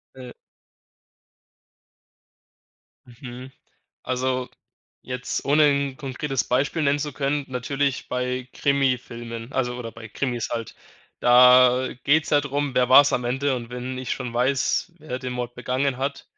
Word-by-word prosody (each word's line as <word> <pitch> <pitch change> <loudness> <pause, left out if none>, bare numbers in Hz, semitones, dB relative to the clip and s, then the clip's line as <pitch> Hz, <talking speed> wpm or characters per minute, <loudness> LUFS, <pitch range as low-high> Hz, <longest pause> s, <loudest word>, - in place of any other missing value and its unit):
Ne. 125 -2 -10 2.7
Mhm, 125 +1 -10 0.5
also, 130 0 -1 0.5
jetzt 125 0 -4
ohne 150 +2 +4
'n 140 -1 0
konkretes 135 -1 -3
Beispiel 140 +6 0
nennen 145 0 +2
zu 145 0 -4
können, 145 +1 -1
natürlich 135 +2 -2
bei 125 0 -3
Krimifilmen, 125 -4 -1
also 125 -2 -1
oder 115 -2 -7
bei 115 -1 -11
Krimis 120 0 -3
halt. 115 -2 -4 0.5
Da 125 +1 +6 0.2
geht's 150 +2 +3
ja 145 - +4
drum, 145 -1 -2
wer 125 -1 +3
war's 140 +2 +7
am 125 - 0
Ende 135 +3 0
und 120 -2 -6
wenn 125 +1 -5
ich 130 - -5
schon 125 -3 -3
weiß, 130 +7 0
wer 140 -5 -5
den 130 -1 -5
Mord 120 -1 -4
begangen 130 +2 -1
hat 140 +1 -3
130 Hz, 135 wpm, -24 LUFS, 125-140 Hz, 2.7 s, war's